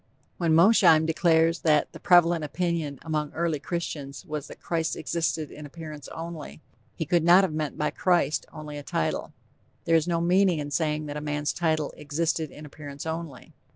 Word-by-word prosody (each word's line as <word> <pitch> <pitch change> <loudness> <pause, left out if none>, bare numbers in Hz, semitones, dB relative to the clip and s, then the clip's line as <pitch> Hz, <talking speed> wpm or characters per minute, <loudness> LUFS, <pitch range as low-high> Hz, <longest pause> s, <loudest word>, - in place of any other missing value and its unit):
When 165 -3 +3
Mosheim 170 -3 +6
declares 165 0 +3
that 150 -2 +2
"The - - -11
prevalent 175 -2 +4
opinion 160 -2 -2
among 155 -2 -2
early 165 -2 -1
Christians 150 -2 -5
was 150 -4 -5
that - - -12
Christ 165 -1 -1
existed 160 -2 -2
in 150 - -10
appearance 150 0 -9
only," 165 -2 -7 0.4
he 160 - -3
could 170 +2 +2
not 175 +3 +7
have 180 -5 -1
meant 155 -2 -3
by 150 0 0
'Christ' 170 -3 +1
only 150 -1 -7
a - - -7
title. 80 - -2 0.5
There 165 - +3
is 160 0 +2
no 170 -1 +1
meaning 180 +1 +3
in 145 -1 -4
saying 155 -1 0
that 145 0 -5
a - - -4
man's 150 0 -2
title 155 -4 0
"existed 155 +1 -1
in 150 +3 -11
appearance 145 -1 -9
only?" 160 -5 -6
160 Hz, 180 wpm, -26 LUFS, 150-170 Hz, 0.5 s, not